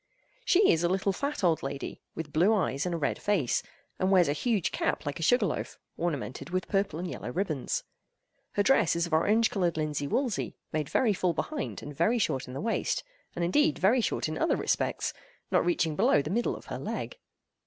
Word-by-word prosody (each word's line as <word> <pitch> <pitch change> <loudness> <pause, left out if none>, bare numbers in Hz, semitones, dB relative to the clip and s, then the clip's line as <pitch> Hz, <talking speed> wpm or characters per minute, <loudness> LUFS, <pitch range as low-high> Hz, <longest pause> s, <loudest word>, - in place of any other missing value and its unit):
She 385 +3 +5
is 165 +1 +2
a 175 - +3
little 190 +1 +1
fat 280 +3 -3
old 165 -3 +3
lady, 135 0 -5
with 150 -3 -6
blue 185 +8 +4
eyes 160 -5 0
and 175 - -1
a - - -1
red 150 - -1
face, 185 - +1 0.4
and 185 - +2
wears 185 -3 +5
a 145 - +2
huge 195 +1 0
cap - - -1
like 145 +4 -3
a - - -5
sugar 245 +10 +4
loaf, - - -3 0.2
ornamented 145 -4 -3
with 185 +1 -2
purple 195 -4 0
and 180 +2 -3
yellow 125 - -5
ribbons. 160 -5 -2 0.7
Her 205 - +2
dress 260 - +4
is 170 0 +1
of 170 - -7
orange 215 +8 +3
colored 175 -5 0
linsey 150 -2 -1
woolsey, 245 - -1 0.2
made 155 -2 -1
very 235 -5 +3
full 180 -2 0
behind 305 - -3
and 145 - -8
very 210 - +2
short 145 - 0
in 125 - -8
the - - -3
waist—and 230 - -3
indeed 295 - +3
very 225 +7 +4
short - - -1
in - - -4
other - - +2
respects, - - -1 0.4
not - - +4
reaching 165 - +1
below 145 -1 +4
the 150 - -4
middle 235 +4 0
of - - -11
her - - -5
leg. - - -5
180 Hz, 205 wpm, -29 LUFS, 155-220 Hz, 0.7 s, She